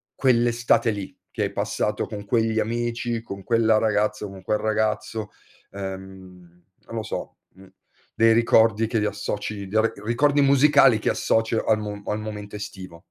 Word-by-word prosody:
quell'estate 120 -2 +2
lì 100 -2 -6 0.2
che - - -2
hai - - -2
passato 105 0 -1
con 105 -2 -7
quegli 110 0 +1
amici, 120 +1 -2
con 100 -3 -8
quella 115 -2 +3
ragazza, 105 -1 0
con 95 -1 -11
quel 105 - 0
ragazzo, 110 0 -1 0.4
uhm, 95 -2 -9 0.3
non 115 - -8
lo 110 - -2
so, 110 - -6 0.2
mhmm, 95 0 -16 0.4
dei 115 0 +4
ricordi 115 -1 +4
che 115 - 0
li 105 - 0
associ 105 0 -4
dei 110 +3 +2
ri 115 - +1
ricordi 145 +5 +2
musicali 140 -3 +5
che - - 0
associ 115 0 +1
al 110 -1 +3
mo 105 -1 -6
al 105 - -2
momento 105 -1 -7
estivo? 95 -4 -9
110 Hz, 160 wpm, -24 LUFS, 100-115 Hz, 0.4 s, musicali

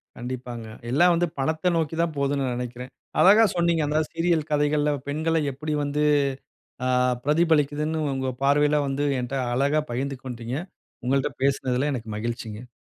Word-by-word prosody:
கண்டிப்பாங்க. 125 -2 -6 0.3
எல்லாம் 175 +6 +5
வந்து 175 +1 +1
பணத்த 160 +6 +1
நோக்கி 160 -1 -1
தான் 170 -1 0
போதுனு 140 0 0
நான் 125 - -2
நினைக்கிறேன். 125 +1 -6 0.3
அழகா 210 +4 +7
சொன்னீங்க. 170 -2 +2
அந்த 150 +1 +1
சீரியல் 165 -2 0
கதைகள்ல 150 0 +2 0.2
பெண்கள 160 +3 0 0.2
எப்பிடி 150 +3 -3
வந்து 145 +1 0 0.8
ஆ - - +2 0.4
பிரதிபலிக்கிதுன்னு 150 0 +2 0.2
உங்க 130 0 -2
பார்வையில 145 +2 +3
வந்து 135 +1 -1 0.2
என்ட்ட 125 +2 -4 0.2
அழகா 140 +4 +2
பகிர்ந்து 135 +3 -2
கொண்டீங்க. 120 -1 -5 0.5
உங்கள்ட்ட 135 +2 +1
பேசினதுல 135 0 +1
எனக்கு 115 -3 -6
மகிழ்ச்சிங்க. 115 0 -5
145 Hz, 140 wpm, -25 LUFS, 125-155 Hz, 0.8 s, அழகா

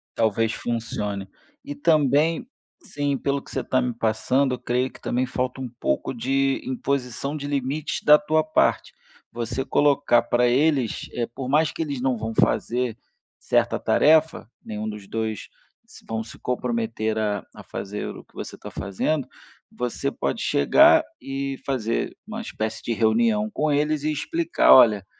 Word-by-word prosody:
Talvez 110 0 +1
funcione. 105 -4 -3 0.4
E 290 +1 -6
também, 160 - +2 0.4
sim, 145 -1 -2
pelo 140 0 -1
que - - -15
você - - -2
está 130 -1 +1
me 125 -1 -1
passando, 125 +4 +1
eu - - -14
creio 125 +1 -1
que - - -16
também 125 +1 0
falta 125 +1 -3
um 125 - -4
pouco - - -1
de 135 +3 0
imposição 130 +1 -2
de 145 - -5
limites 140 +2 -2
da 150 0 +8
tua 155 -4 +1
parte. 155 - +1 0.4
Você 120 +2 -3
colocar 140 -3 +3
para 120 +1 +2
eles, 135 -1 +1
eh, 120 -1 -2
por 125 +2 -7
mais 155 +2 +3
que - - -6
eles 140 -5 -3
não 130 -2 +1
vão 110 +1 -4
fazer 120 -2 +1 0.4
certa - - +1
tarefa, 160 -5 +3
nenhum 110 0 -4
dos 105 -2 -8
2 110 -1 -3 0.4
se - - -16
vão 110 0 -3
se 115 - -12
comprometer 125 - -2
a 105 -2 -1
a - - -11
fazer 105 +1 -5
o - - -9
que - - -32
você - - -7
está - - -10
fazendo, 135 +9 -2 0.4
você 125 +3 -3
pode - - -2
chegar 315 - +5 0.2
e 135 0 -4
fazer 120 -4 -1
uma 220 +1 -5
espécie 110 - -4
de 115 - -1
reunião 210 - +2
com 155 -6 0
eles 150 0 +1
e 155 - +1
explicar: 325 - +1
"Olha, 105 -6 +6
130 Hz, 160 wpm, -24 LUFS, 115-150 Hz, 0.4 s, da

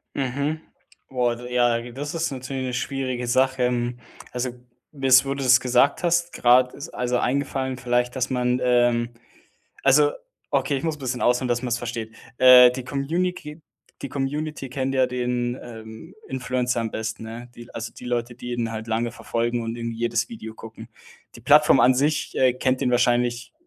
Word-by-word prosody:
Mhm. 140 +4 -2 0.5
Boah, 125 -2 0
d 125 +1 -9
ja, 120 -1 +1
das 145 +4 -5
ist 165 -2 -1
natürlich 130 0 -5
'ne 125 -1 -3
schwierige 130 -1 -3
Sache. 130 0 +2
Hm, 120 0 -2 0.3
also, 125 0 -2 0.4
bis 135 -2 +4
wo 135 - -1
du 140 - -4
das 130 0 +6
gesagt 130 +6 +2
hast, 175 0 +1
grad 125 +1 +4
ist 140 - -8
also, 125 0 -1
eingefallen 130 0 -1
vielleicht, 125 0 0
dass 130 -1 -1
man, 125 -1 0
ähm 120 -1 +2 0.7
also, 145 +2 +5 0.4
okay, 140 0 0
ich 135 - -6
muss 160 -2 -1
'n - - -21
bisschen 125 -1 -3
ausholen, 125 +1 +2
dass 120 0 0
man's 120 -2 -1
versteht. 115 -2 -5 0.2
Äh, 125 -1 +9
die 130 0 -6
Communiki 155 +3 -3 0.4
die 140 - -5
Community 145 +1 -3
kennt 130 +1 -3
ja 130 -1 +3
den, 125 0 -2
ähm, 110 +7 -11
Influencer 125 -2 -1
am 115 -1 -3
besten, 110 0 -4
ne? 115 +2 -8
Die 120 0 -13
also, 115 0 -6
die - - -13
Leute, 120 -1 -2
die 120 0 -7
ihn 120 -1 -2
halt 110 0 -6
lange 115 +1 -1
verfolgen 120 +1 -2
und 115 +1 -4
irgendwie 115 -1 -4
jedes 120 0 0
Video 220 - -9
gucken. 110 0 -11 0.5
Die - - -12
Plattform - - +5
an 130 - +6
sich, 150 +3 0
äh, 130 -1 +4
kennt 130 +1 0
ihn 125 -2 +1
wahrscheinlich 120 - +1
125 Hz, 180 wpm, -23 LUFS, 120-135 Hz, 0.7 s, Äh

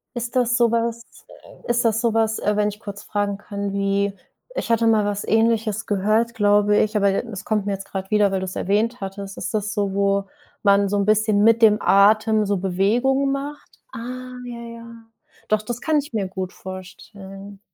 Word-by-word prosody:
Ist 240 +1 -4
das 245 -1 +2
sowas 235 -1 +1 0.6
ist 240 0 +1
das 225 0 +2
sowas, 225 -2 +1
äh, 210 - 0
wenn 210 0 +2
ich 210 - -9
kurz 200 -2 -8
fragen 205 -1 -2
kann, 200 -1 -5
wie, 200 0 0 0.4
ich - - -3
hatte 230 0 +3
mal 215 -2 +3
was 205 0 -2
Ähnliches 225 -1 +1
gehört, 215 +3 +1
glaube 205 0 +3
ich, 215 +1 +1
aber 200 -1 +3
d - - 0
es 195 - -7
kommt 210 -2 0
mir 200 - -1
jetzt 195 0 -6
gerade 190 0 -6
wieder, 205 -2 +3
weil 190 - 0
du 190 - -3
es 185 - -7
erwähnt 215 +5 0
hattest. 195 0 -6
Ist 210 - -4
das 210 0 -1
so, 200 -2 -1
wo 200 0 +1 0.4
man 200 -1 +4
so 205 +1 0
'n 200 - +1
bisschen 215 -1 +3
mit 230 +1 +5
dem 210 -1 +6
Atem 215 +2 +4
so 200 -1 0
Bewegungen 235 +9 +1
macht? 285 +2 -6
Ah 255 +2 -7
ja, 235 -1 -7
ja. 230 -1 -11 0.4
Doch, 215 0 +2
das 240 +2 -5
kann 315 -1 +1
ich 290 -3 -7
mir 205 -4 -1
gut 185 -1 -5
vorstellen. 195 +1 -10
210 Hz, 195 wpm, -22 LUFS, 200-230 Hz, 0.6 s, dem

